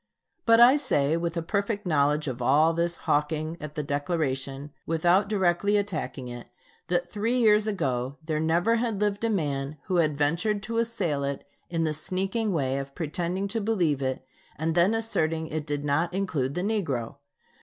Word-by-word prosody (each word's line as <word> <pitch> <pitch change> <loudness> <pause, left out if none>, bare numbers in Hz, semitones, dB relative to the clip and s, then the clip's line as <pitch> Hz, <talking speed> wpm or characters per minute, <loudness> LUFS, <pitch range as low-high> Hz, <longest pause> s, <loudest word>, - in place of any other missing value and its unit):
But 230 0 +6
I 250 +4 +8
say, 155 - +2
with 170 0 -2
a 165 - -1
perfect 200 +3 -1
knowledge 150 -2 +2
of 130 -2 -4
all 150 +6 +4
this 170 +1 0
hawking 155 +2 0
at 150 0 -7
the 150 - -2
Declaration 145 -1 -2 0.2
without 175 +5 +3
directly 200 0 +2
attacking 165 -10 -3
it, 120 -1 -8 0.4
that 175 0 -1
three 225 +4 0
years 215 -3 +4
ago 135 - -1
there 155 -1 -1
never 170 +8 +2
had 225 -3 -1
lived 205 0 0
a 230 - +2
man 145 -7 -2
who 185 - -1
had 155 -4 +2
ventured 175 +8 0
to 230 +2 -2
assail 170 -11 -1
it 140 0 -4 0.2
in 165 -1 0
the 155 -1 0
sneaking 190 +7 -2
way 135 -5 0
of 140 0 -7
pretending 175 +4 -2
to 225 +2 -2
believe 175 -10 +1
it 130 0 -2 0.3
and 160 +2 -1
then 175 +6 +3
asserting 165 -8 0
it 155 0 -4
did 145 0 -2
not 155 +5 0
include 150 -9 -1
the 180 - -1
negro. 145 - -2
165 Hz, 175 wpm, -27 LUFS, 145-200 Hz, 0.4 s, I